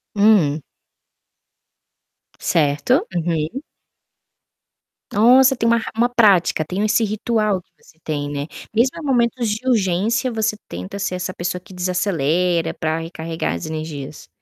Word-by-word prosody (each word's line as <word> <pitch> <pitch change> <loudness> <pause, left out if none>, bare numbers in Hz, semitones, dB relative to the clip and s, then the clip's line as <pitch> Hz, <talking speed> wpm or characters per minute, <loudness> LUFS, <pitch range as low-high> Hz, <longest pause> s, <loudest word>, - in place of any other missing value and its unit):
Hum. 200 -8 +4 1.8
Certo. 150 - +2
Uhum. 165 - -2 1.5
Nossa, 255 +5 +6
tem 230 -2 0
uma 235 0 +4
ra 225 - -4
uma 235 +2 +2
prática, 205 -9 +4
tem 185 +5 -3
o - - +2
esse 225 +2 +2
ritual 215 -2 0
que - - -41
você 160 - -22
tem, 145 -2 -3
né, 145 0 -4 0.3
mesmo 240 +4 +2
em 320 - -7
momentos 240 -3 +1
de 215 +5 -3
urgência 225 +2 +1
você 220 -1 0
tenta 90 - -7
ser 190 -2 -2
essa 180 +1 -4
pessoa 180 +1 -3
que 185 - -15
desacelera 180 -2 0
pra 160 0 -2
recarregar 165 - -4
as 85 - -5
energias? 155 -2 -6
185 Hz, 135 wpm, -20 LUFS, 160-225 Hz, 1.8 s, Nossa